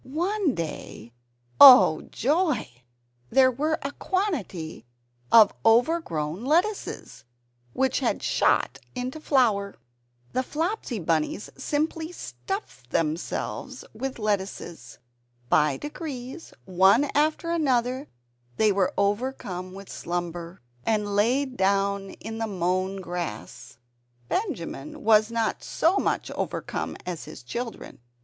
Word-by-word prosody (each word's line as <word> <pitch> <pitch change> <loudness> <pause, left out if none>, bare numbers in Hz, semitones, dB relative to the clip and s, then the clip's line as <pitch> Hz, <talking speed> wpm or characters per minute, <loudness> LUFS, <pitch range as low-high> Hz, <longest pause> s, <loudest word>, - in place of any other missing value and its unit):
One 345 - -1
day 135 -8 -6 0.5
oh 250 - +10
joy! 305 - +1 0.6
there 260 - +5
were 305 +5 0
a 280 - -3
quantity 275 - -3 0.5
of 220 -3 +8
overgrown 225 - +2
lettuces, 350 +10 -1 0.5
which 265 0 +1
had - - -1
"shot" - - +2 0.2
into 255 +4 -4
flower. 220 -10 +2 0.6
The 255 - +1
Flopsy 315 - -2
Bunnies 165 +2 -1
simply 315 +4 -2
stuffed 355 - -7
themselves 160 +3 -3
with 260 +4 -4
lettuces. 195 - -3 0.5
By 150 -3 +3
degrees, 295 -1 -7
one 190 +9 +4
after 310 +3 +1
another, 260 -4 +1 0.5
they 215 -1 +4
were 195 -2 +1
overcome 200 -3 -1
with 195 +1 -10
slumber, 175 0 -5 0.2
and 210 -2 0
lay 245 +7 +3
down 200 -4 0
in 225 +2 -7
the 225 - -1
mown 185 0 -1
grass. 175 -13 -6 0.5
Benjamin 210 - -4
was 215 0 +5
not 230 -1 -1
so 345 +5 +2
much - - -1
overcome - - -4
as 175 -3 -5
his 125 - -10
children. 235 - -6
225 Hz, 105 wpm, -26 LUFS, 185-285 Hz, 0.6 s, oh